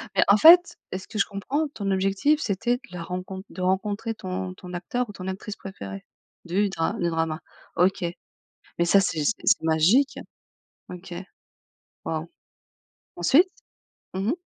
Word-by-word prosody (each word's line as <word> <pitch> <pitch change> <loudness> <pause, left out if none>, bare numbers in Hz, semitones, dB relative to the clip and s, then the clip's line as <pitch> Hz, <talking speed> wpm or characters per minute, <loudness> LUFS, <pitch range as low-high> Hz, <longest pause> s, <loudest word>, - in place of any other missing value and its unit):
Mais, - - +5
en 200 +1 +6
fait, 350 +7 +8 0.2
à - - -1
ce - - -13
que 215 - -5
je - - +4
comprends, 275 +10 -2
ton 200 -7 -3
objectif, 195 +11 +2
c'était 235 +4 0
de - - -25
le 180 - -6
rencon 185 +2 -5
de 185 - -8
rencontrer 205 +4 0
ton 185 -1 -4
ton 180 -1 -10
acteur 240 +8 -2
ou - - -6
ton 185 -1 -7
actrice 200 +2 -5
préférée 100 - -8 0.4
du 195 +4 +1
dra 165 -3 -1
du 170 - -1
drama. 160 -1 -1 0.4
OK, 185 +1 +2 0.8
mais 170 - +3
ça, 195 +3 +5
c'est 165 -6 0
c'est 225 - +2
c'est 215 - +4
magique. 170 - +3 0.7
OK. 180 0 -9 0.9
Waouh! - - -3 0.9
Ensuite? 290 - +4 0.6
Mmh 195 +3 -1
mh. - - +2
190 Hz, 160 wpm, -25 LUFS, 180-215 Hz, 0.9 s, fait